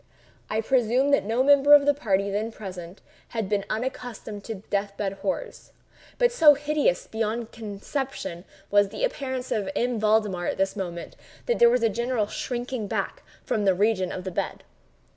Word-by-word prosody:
I 215 +1 0
presume 255 +3 +2
that 280 - +3
no 230 +4 +1
member 285 +1 +7
of 285 -1 +5
the 290 - +5
party 200 -7 0
then 215 +3 -2
present 185 -4 -9 0.3
had 225 -4 -3
been 200 0 0
unaccustomed 225 -3 -5
to 225 - -4 0.2
death 200 0 -1
bed 195 -2 -2
horrors; 460 - -4 0.4
but 485 0 +3
so 315 -10 +7
hideous 290 -9 0
beyond 225 +1 -3
conception 215 - -5 0.3
was 205 -1 +4
the 220 - -5
appearance 260 - -2
of 210 +1 -1
M. 245 -3 0
Valdemar 210 -4 +1
at - - -2
this 195 +2 0
moment, 175 -4 -5 0.3
that 485 - 0
there 235 - +8
was 245 0 +2
a - - +5
general 235 0 0
shrinking 245 +1 -4
back - - -3 0.2
from 210 - -1
the 190 -2 +3
region 195 -2 +1
of 185 - -5
the 185 - -4
bed. 170 - -3
220 Hz, 175 wpm, -26 LUFS, 200-260 Hz, 0.4 s, there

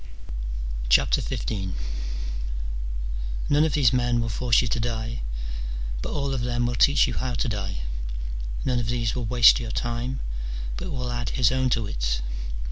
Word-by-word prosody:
XV. 95 - +2 1.8
None 145 +1 +5
of 160 -3 +2
these 130 -6 +5
men 120 -1 +2
will 115 -1 0
force 120 +2 +3
you - - 0
to 120 - 0
die, 115 0 -2 0.8
but - - -3
all 140 -1 -1
of 130 - -1
them 120 0 +1
will 120 - 0
teach 140 +4 +6
you - - -2
how 125 -1 -1
to 130 - 0
die: 95 - -2 0.8
none 125 -2 +2
of 120 - -1
these 115 -1 0
will 125 -2 -2
waste 120 +1 +7
your 120 -2 -4
time, 120 +3 -2 0.6
but - - -4
will 125 -3 -2
add 120 -2 -2
his 125 -3 +5
own 130 0 +2
to 115 -3 +1
it. - - -1
120 Hz, 160 wpm, -26 LUFS, 115-125 Hz, 1.8 s, waste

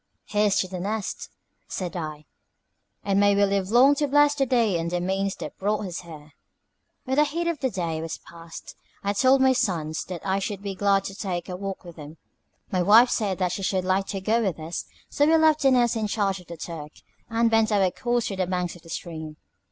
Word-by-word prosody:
"Here's 210 -1 +2
to 185 - -3
'The 185 -1 -6
Nest,'" 205 +2 -4 0.4
said 180 -2 -5
I; 155 -3 -5 0.8
"and 200 -1 +1
may 205 0 +4
we 200 0 +4
live 195 -1 -1
long 250 +5 +6
to 290 - +1
bless 290 +1 +4
the 275 -2 0
day 230 -8 +2
and 165 +1 -2
the 175 +1 -1
means 190 +2 -1
that - - -8
brought 210 +2 0
us 180 -3 -5
here." 155 -3 -12 0.7
When 265 +1 -2
the 300 - +6
heat 330 +3 -2
of 335 -3 -1
the 260 - 0
day 170 -6 -3
was 165 -1 -5
past, 165 -1 -12 0.3
I 200 0 0
told 260 +5 +4
my 265 0 +5
sons 165 -10 -1
that 180 -2 -7
I 195 0 +1
should 200 0 -4
be 200 -1 -3
glad 195 0 +2
to 195 - -6
take 180 -3 -4
a 180 - -4
walk 195 +1 -5
with 175 -2 -12
them. 150 +1 -10 0.5
My 185 - +1
wife 225 +7 +6
said 200 -4 0
that 180 -2 0
she 190 - -4
should 185 -1 0
like 190 +1 +1
to 195 -2 -4
go 220 +4 +2
with 190 -7 -1
us; 160 +2 -5 0.2
so 290 - +2
we 325 +1 +5
left 315 -1 +4
The 270 - +5
Nest 245 -2 +3
in 220 -1 -1
charge 200 -3 0
of 180 - -16
Turk, 155 -3 -7 0.4
and 230 0 +2
bent 225 -1 +3
our 195 -3 +3
course 240 +2 -1
to 195 - -4
the 185 -1 -1
banks 180 -1 -2
of 175 - -14
the 165 - -16
stream. 160 -2 -6
195 Hz, 230 wpm, -25 LUFS, 175-230 Hz, 0.8 s, long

